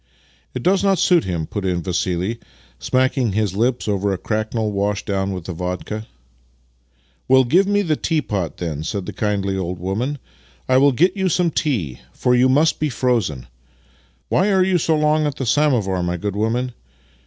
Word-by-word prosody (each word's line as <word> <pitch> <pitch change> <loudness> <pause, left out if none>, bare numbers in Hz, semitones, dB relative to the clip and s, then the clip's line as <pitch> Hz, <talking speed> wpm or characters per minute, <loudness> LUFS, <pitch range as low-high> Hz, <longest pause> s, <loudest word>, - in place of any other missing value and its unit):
" - - -36
It - - -4
does 190 +2 +3
not 195 -1 +3
suit 175 0 +3
him," 85 -4 -2
put 100 +5 -5
in 90 -2 -1
Vassili, 90 +5 -1 0.4
smacking 130 - +1
his 105 -3 0
lips 120 +3 0
over 100 -1 0
a 95 - -1
cracknel 110 +2 -2
washed 100 0 -1
down 100 -1 -1
with 90 -3 -6
vodka. 90 +5 -5 0.6
" - - -40
Well, 130 0 +6
give 175 +11 +3
me 205 0 +2
the 160 -4 +1
tea 155 0 -1
pot, 95 -9 -3
then," 80 -4 -4
said 100 +3 -3
the - - -6
kindly 100 -2 -1
old 90 -1 -3
woman. 105 +11 -2 0.3
" 65 0 -31
I 130 - +4
will 140 +2 +5
get 175 - +2
you 190 -2 0
some 175 0 +1
tea, 110 - -1
for 125 - +1
you 125 +1 +4
must 150 +5 +3
be 150 - 0
frozen. 115 - -1 0.8
Why 200 +3 +2
are 190 -1 +4
you 185 -1 +2
so 160 0 +1
long 150 0 +2
with 145 -2 -2
the 135 - -4
samovar, 115 -9 +2
my 90 0 -1
good 100 +3 -3
women? 120 +4 -1
110 Hz, 190 wpm, -20 LUFS, 95-145 Hz, 0.8 s, Well